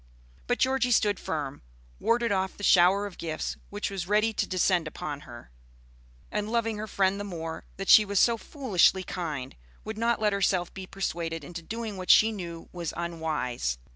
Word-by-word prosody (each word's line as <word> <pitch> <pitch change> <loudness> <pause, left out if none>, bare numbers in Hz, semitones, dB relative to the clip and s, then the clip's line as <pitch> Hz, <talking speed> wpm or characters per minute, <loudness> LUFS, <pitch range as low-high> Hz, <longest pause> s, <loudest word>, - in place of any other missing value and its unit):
But - - +1
Georgie 260 -1 +2
stood 210 -4 +3
firm, 145 -3 -4 0.4
warded 235 -1 +1
off 190 -1 -1
the 205 - -9
shower 190 +2 +5
of 200 - -9
gifts 160 -2 -3
which 205 0 -3
was 185 -3 -4
ready 215 +2 +2
to - - -1
descend 180 -2 +2
upon 150 -2 -5
her, 120 - -11 0.8
and 210 0 -2
loving 225 -2 0
her 215 - -4
friend 195 -1 +1
the - - -3
more 165 -5 -6
that 195 0 -5
she 215 - +9
was 200 -2 0
so 235 - +5
foolishly 215 - +2
kind, 150 -8 -5 0.3
would 220 0 -6
not 235 0 +2
let 210 -1 +2
herself 185 -3 +1
be 190 -1 -8
persuaded 165 -5 -3
into 170 +3 -7
doing 220 +3 -5
what 185 -1 -7
she 220 +1 +7
knew 170 -5 -7
was 170 -3 -5
unwise. 155 - -2
190 Hz, 180 wpm, -28 LUFS, 165-210 Hz, 0.8 s, she